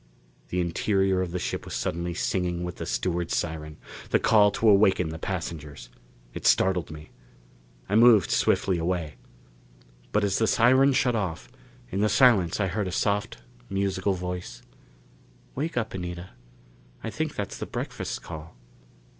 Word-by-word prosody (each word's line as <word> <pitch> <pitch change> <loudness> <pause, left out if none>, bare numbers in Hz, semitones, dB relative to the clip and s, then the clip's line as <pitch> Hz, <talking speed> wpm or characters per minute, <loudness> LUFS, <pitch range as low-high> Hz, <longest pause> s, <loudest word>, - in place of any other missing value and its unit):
The 90 - -1
interior 95 +2 +1
of 90 - -2
the 90 - -3
ship 90 - -3
was - - -6
suddenly 85 +1 -2
singing 90 -1 -1
with 90 -1 -5
the - - -5
steward's 85 -2 -1
siren 75 -2 -4 0.3
the - - +4
call 105 -2 +5
to 115 - +1
awaken 100 -4 +4
the 80 0 -6
passengers. 80 -8 -5 0.4
It - - -2
startled 95 -3 +3
me. 75 -1 -11 0.8
I 100 - -4
moved 110 -3 +6
swiftly 90 -3 +2
away. 85 -5 -2 0.9
But 105 - +1
as 100 -1 +1
the 110 - +2
siren 130 +5 +4
shut 125 -1 +2
off, 80 - -3 0.4
in 95 - -1
the 105 - +3
silence 105 -11 +4
I 100 - +2
heard 95 +2 -2
a - - -4
soft, 100 +2 -1 0.3
musical 95 0 0
voice: 90 -8 -6 0.9
"Wake 155 +1 -3
up, 115 -2 -1
Anita, 90 0 -6 0.7
I - - -4
think - - -3
that's - - -5
the - - -5
breakfast - - -5
call." 80 +1 -9
90 Hz, 155 wpm, -26 LUFS, 85-105 Hz, 0.9 s, moved